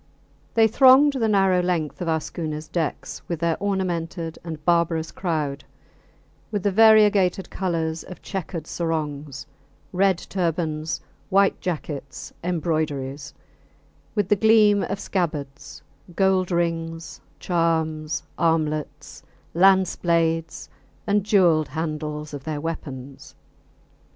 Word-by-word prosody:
They 225 -1 +6
thronged 265 +5 +6
the 240 -5 0
narrow 195 -3 +3
length 175 -3 -2
of 175 - -3
our 160 -1 +1
schooners 155 -1 -5
decks 165 -3 -3
with 170 -3 -3
their 170 -1 +1
ornamented 175 -4 -2
and 160 -3 -7
barbarous 170 -2 +1
crowd, 150 -6 -2 0.9
with 205 -4 -3
the 205 - +2
variegated 205 -3 +4
colours 165 -3 -2
of 180 - -11
checkered 175 -4 -5
sarongs, 150 -5 -4 0.5
red 190 0 +3
turbans, 165 -4 -2 0.3
white 195 +1 +3
jackets, 150 -5 -5
embroideries; 155 -5 -2 0.8
with 205 -4 +1
the 210 - +4
gleam 210 -1 +5
of 200 - -4
scabbards, 155 -8 -4 0.3
gold 190 -1 +2
rings, 165 -1 -2 0.2
charms, 160 -3 -1 0.2
armlets, 155 -2 -1 0.3
lance 190 +1 +4
blades, 165 -1 0 0.4
and 205 -1 +2
jewelled 175 -7 +3
handles 150 -1 -4
of 140 -2 -6
their 155 0 -3
weapons. 140 -4 -7
165 Hz, 110 wpm, -23 LUFS, 155-190 Hz, 0.9 s, They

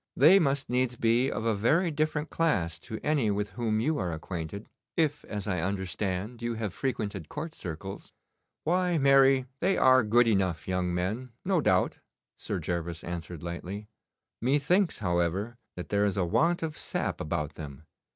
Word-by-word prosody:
They 165 +9 +8
must 140 -5 +1
needs 125 0 +1
be 120 +3 +2
of 110 - -3
a 115 - +3
very 160 - +2
different 155 0 -1
class 90 - 0
to 110 +5 -7
any 145 -8 +2
with 105 0 -1
whom 110 -3 0
you 150 +7 +1
are 90 -3 -1
acquainted, 85 +4 -5 0.3
if, 150 -3 +1
as 105 -2 -5
I 95 -4 -1
understand, 95 +4 -2
you 120 0 -2
have 110 -4 -3
frequented 100 - -3
court 155 +2 -5
circles.' 95 - -7 0.5
'Why, 180 +1 +2
marry, 135 -2 +5
they 190 +2 +2
are 130 -1 +6
good 115 +3 +4
enough 95 -7 +1
young 90 -1 0
men, 105 +8 -2
no 185 -3 +2
doubt,' 90 -9 +2 0.4
Sir 100 - -4
Gervas 85 0 -3
answered 85 -1 -6
lightly. 95 +5 -6 0.5
'Methinks, 150 - +2
however, 90 +7 0 0.2
that 90 -4 -7
there 100 0 +2
is 100 -1 0
a 90 - +2
want 165 - +2
of 155 -2 -3
sap - - -2
about 75 -1 -2
them. 75 -2 -9
110 Hz, 165 wpm, -29 LUFS, 90-135 Hz, 0.5 s, They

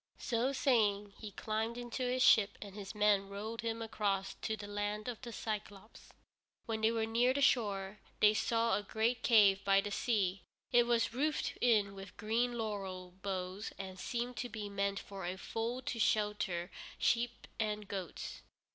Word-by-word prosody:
So 240 +3 0
saying, 210 -7 +2
he 215 - -6
climbed 220 +3 -2
into 245 +1 -5
his 255 0 +2
ship, 215 -6 +5
and 200 -2 -8
his 200 0 -7
men 205 -2 +3
rowed 215 +3 -5
him 230 0 -2
across 205 -3 -1
to 220 - -2
the 210 - -7
Land 205 +1 -3
of 240 -3 -4
the 245 - -7
Cyclôpes. 215 -2 -6 0.6
When 220 -2 -2
they 220 - +5
were 225 -1 0
near 240 +3 +2
the 280 - +1
shore 205 -5 +2 0.2
they 210 0 +6
saw 230 +1 +1
a - - 0
great 225 +3 0
cave 200 -5 +5
by 195 0 +5
the 205 +1 -2
sea. 200 -4 +1 0.3
It 240 -1 +5
was 235 -1 +2
roofed 295 +5 0
in 210 -5 +4
with 195 -1 -10
green 235 +3 0
laurel 195 -5 -4
boughs 190 +1 -4
and 190 -1 -7
seemed 240 +3 -3
to 245 - -3
be 210 -3 -5
meant 200 0 -1
for 195 -1 -7
a 180 +2 -3
fold 235 +5 -3
to 230 - -3
shelter 210 -5 +1 0.3
sheep 240 0 +1
and 210 -1 -1
goats. 190 -4 -5
215 Hz, 175 wpm, -34 LUFS, 200-230 Hz, 0.6 s, they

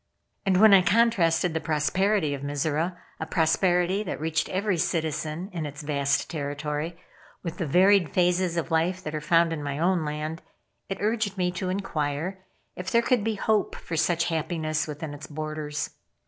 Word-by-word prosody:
And 185 -1 +4
when 215 -1 +8
I 195 - +8
contrasted 180 -4 +3
the 160 - 0
prosperity 160 +2 +1
of 140 - -5
Mizora 150 +5 -1 0.2
a 160 - -4
prosperity 180 +3 +2
that 205 - -4
reached 160 +1 -1
every 190 0 0
citizen 160 +3 -2
in 160 -4 -3
its 145 +1 -8
vast 140 -1 0
territory 150 +2 -3 0.5
with 170 +2 -5
the 170 - -1
varied 185 +2 +5
phases 180 -1 +1
of 165 0 -2
life 175 +3 +1
that 150 - -5
are 155 - -3
found 165 +1 +3
in 155 - -4
my 145 -1 -3
own 175 +1 +2
land, 155 +2 -4 0.5
it 195 - -3
urged 215 -2 0
me 180 -1 +1
to 185 +1 -3
inquire 185 -1 -2 0.3
if 180 +1 -5
there 235 0 +3
could 245 -4 +2
be 220 0 0
hope 215 0 +1
for 165 - -6
such 165 +1 +2
happiness 155 -2 -1
within 150 0 -6
its 145 +1 -9
borders. 155 -1 -4
165 Hz, 175 wpm, -26 LUFS, 150-185 Hz, 0.5 s, when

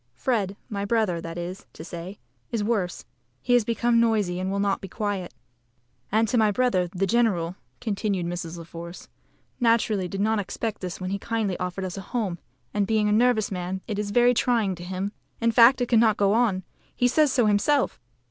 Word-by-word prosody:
Fred 205 - -1
my 200 -2 -3
brother, 205 -5 +1
that 165 0 -7
is 175 +2 -6
to - - -9
say, 175 +4 -7 0.3
is 225 -3 -1
worse. 205 -5 -1 0.3
He 245 - 0
has 245 -2 +5
become 235 +1 +2
noisy, 210 -6 +1
and 185 +1 -2
will 200 - -1
not 200 -1 0
be 195 - -6
quiet." 200 -2 -3 0.8
"And 220 +2 +3
my 215 -1 +4
brother, 205 -5 +1
the 185 +2 -1
general," 195 -6 +1 0.2
continued 200 -5 -1
Mrs. 170 -1 -4
La 170 - -7
Force, 170 +1 -9 0.5
"naturally 230 -5 +2
did 195 +2 -5
not 220 +1 +2
expect 215 +2 -4
this 180 -2 -5
when 185 0 -4
he 200 - -2
kindly 220 -4 -1
offered 180 +1 -3
us 185 0 -5
a - - -6
home, 195 -4 -3 0.3
and, 205 -1 +1
being 215 -1 +2
a - - +2
nervous 220 -1 +3
man, 185 0 -3
it 210 -3 -3
is 210 -1 -2
very 245 +3 +4
trying 230 -5 +1
to 175 -1 -9
him. 190 +2 -3 0.3
In 230 0 +2
fact, 240 +2 +6
it 245 - 0
cannot 225 -2 +4
go 200 0 +3
on. 215 -5 +2 0.3
He 245 - +3
says 290 +3 +3
so 250 -3 +3
himself." 215 +8 +2
205 Hz, 195 wpm, -25 LUFS, 185-230 Hz, 0.8 s, fact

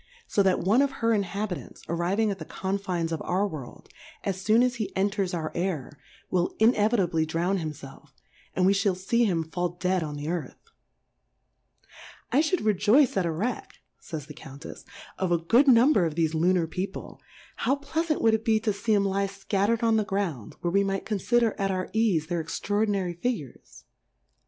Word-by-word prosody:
So 205 - +1
that 190 -2 +2
one 210 +9 +3
of 280 -1 +1
her 230 -3 +1
Inhabitants 200 -2 -3
arriv^ig 185 +6 0
at 195 - -5
the - - -5
Confines 190 -4 -3
of 165 - -3
our 190 +3 0
World, 150 -9 -9 0.4
as 190 -1 -3
foon 220 +4 +4
as 250 -1 0
he 220 - -3
enters 195 -1 0
our 160 -3 -3
Air, 165 -6 -3 0.3
will 180 -1 0
inevitably 210 -7 +3
drown 170 +5 0
himfelf, 150 -4 -8 0.5
and 185 - +2
we 195 - +5
fhall 200 -2 +1
fee 235 +6 +1
him 170 -6 +1
fall 175 +2 -2
dead 180 +1 -1
on 150 -2 -4
the 145 +1 -5
Earth, 170 -1 -4 1.7
I 280 - +4
fhould 320 - 0
rejoice 220 +6 +4
at 185 -3 +1
a - - 0
Wreck, 205 +11 -3 0.2
fays 155 -4 -7
the 150 - -10
Countefsy 140 +2 -11 0.3
of 185 -2 0
a 170 - +4
good 235 - +3
Number 240 - +5
of 155 - -5
thefe 160 -1 +1
Ltinar 175 +2 +2
People, 185 +4 -6 0.4
how 265 +4 +1
pleafant 310 +3 -2
wouM 225 -1 +5
it 220 0 0
be 220 -2 +3
to 215 -1 0
fee 210 +2 0
'em 200 -1 +2
lie 195 0 0
fcatterM 200 +3 -1
on 225 -1 +3
the 215 - +2
Ground, 190 - -3
where 175 - -1
we 200 0 +4
might 195 -1 -2
confider 225 +2 +1
at 195 0 0
our 185 -1 -2
eafe, 215 -8 +2
their 175 -1 -1
extraordinary 200 +2 -1
Figures 175 - -5
195 Hz, 180 wpm, -27 LUFS, 170-220 Hz, 1.7 s, we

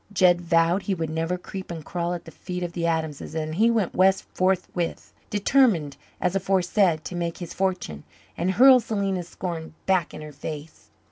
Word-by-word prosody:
Jed 180 -2 +4
vowed 170 +2 +3
he 195 0 -1
would 160 -2 -3
never 165 +3 -1
creep 190 +1 -8
and 165 -3 -6
crawl 175 0 -2
at 175 - -8
the - - -10
feet 180 -1 -5
of 175 -1 -4
the 170 -1 -1
Adamses, 160 -2 -2
and 155 -1 -2
he 220 +7 +4
went 220 -6 +1
west 190 +1 +4
forthwith, 185 -2 -1 0.2
determined, 205 - +2 0.2
as 180 +1 0
aforesaid, 185 -3 +2
to 180 - -5
make 170 -1 -2
his 175 -3 -7
fortune 180 - -2 0.3
and 175 +2 -1
hurl 255 +4 +8
Selena's 195 -6 -2
scorn 165 -3 -5
back 185 -3 +2
in 155 - -8
her 150 - -8
face. 150 +2 -8
175 Hz, 185 wpm, -25 LUFS, 165-190 Hz, 0.3 s, hurl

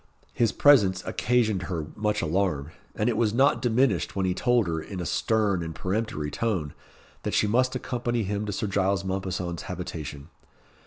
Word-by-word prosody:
His 115 -2 +2
presence 100 -11 +4
occasioned 110 0 +1
her 80 -4 -2
much 105 -1 0
alarm, 80 -3 0 0.2
and 105 - 0
it 120 - +1
was 110 -1 +1
not 135 +3 +4
diminished 110 - +1
when 95 -1 0
he 90 - +1
told 120 +2 +2
her, 80 -2 -2
in 95 +3 -7
a 90 - -3
stern, 105 -1 +1
and 80 -1 -5
peremptory 95 -7 -2
tone, 95 -11 -1 0.5
that - - -2
she - - +3
must 125 +5 +2
accompany 120 -2 -2
him 105 +2 -2
to - - -2
Sir 100 - -2
Giles 100 -1 0
Mompesson's 90 -2 -3
habitation. 75 -5 -6
100 Hz, 170 wpm, -26 LUFS, 90-115 Hz, 0.5 s, presence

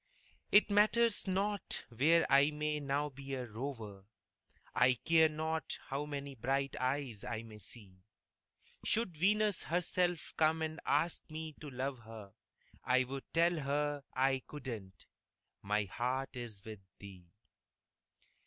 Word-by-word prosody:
It 205 0 +6
matters 215 +1 +4
not 200 +1 -1
where 150 +8 +4
I 140 +2 +6
may 150 0 -1
now 145 +1 0
be 135 0 -6
a 130 -1 -4
rover, 110 -4 -6 0.7
I 125 0 +5
care 160 +4 +4
not 160 0 -2
how 140 +2 -2
many 140 -1 -5
bright 135 +3 -1
eyes 130 -4 -1
I 115 -1 -4
may 110 -2 -11
see; 100 -2 -10 0.8
Should 220 -6 0
Venus 205 +3 +2
herself 175 0 0
come 160 0 +3
and 160 +1 -3
ask 170 +1 +1
me 155 0 -5
to 150 - -6
love 130 0 -3
her, 110 -3 -11 0.5
I'd 130 0 +2 0.2
tell 170 0 +3
her 145 0 -1
I 135 0 +2
couldn't 115 - -7 0.6
my 105 +1 +1
heart 125 +7 -2
is 115 -4 -6
with 110 -2 -7 0.2
thee. 95 -3 -11
140 Hz, 130 wpm, -35 LUFS, 120-160 Hz, 0.8 s, It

